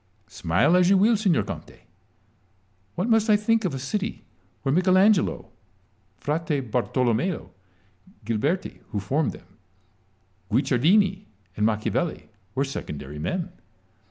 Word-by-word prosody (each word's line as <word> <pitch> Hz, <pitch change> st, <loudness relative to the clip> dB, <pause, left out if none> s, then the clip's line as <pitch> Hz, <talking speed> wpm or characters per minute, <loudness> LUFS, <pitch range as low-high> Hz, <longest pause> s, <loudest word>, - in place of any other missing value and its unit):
Smile 110 Hz, -, +2 dB
as 180 Hz, 0 st, +4 dB
you 195 Hz, -, +5 dB
will, 220 Hz, +4 st, +4 dB
signor 200 Hz, -6 st, +2 dB
Conte, -, -, -9 dB, 1.1 s
what 185 Hz, +5 st, -1 dB
must 225 Hz, -1 st, +3 dB
I 210 Hz, -, +7 dB
think 225 Hz, +2 st, +1 dB
of 160 Hz, -7 st, -1 dB
a -, -, -3 dB
city 205 Hz, -, -4 dB, 0.4 s
where 135 Hz, -, +1 dB
Michel 185 Hz, +2 st, +4 dB
Angelo, 200 Hz, -1 st, +3 dB, 0.7 s
Frate 150 Hz, 0 st, -1 dB
Bartolomeo, 125 Hz, -, 0 dB, 0.7 s
Ghiberti 140 Hz, -, -1 dB
(who 105 Hz, -, -2 dB
formed 135 Hz, +11 st, 0 dB
them), 95 Hz, +2 st, -17 dB, 0.9 s
Guicciardini, 170 Hz, -, +3 dB, 0.3 s
and 105 Hz, +1 st, +2 dB
Machiavelli 110 Hz, +9 st, -2 dB, 0.3 s
were 135 Hz, +1 st, +1 dB
secondary 75 Hz, -, -6 dB
men 165 Hz, -, -3 dB
160 Hz, 120 wpm, -25 LUFS, 120-195 Hz, 1.1 s, I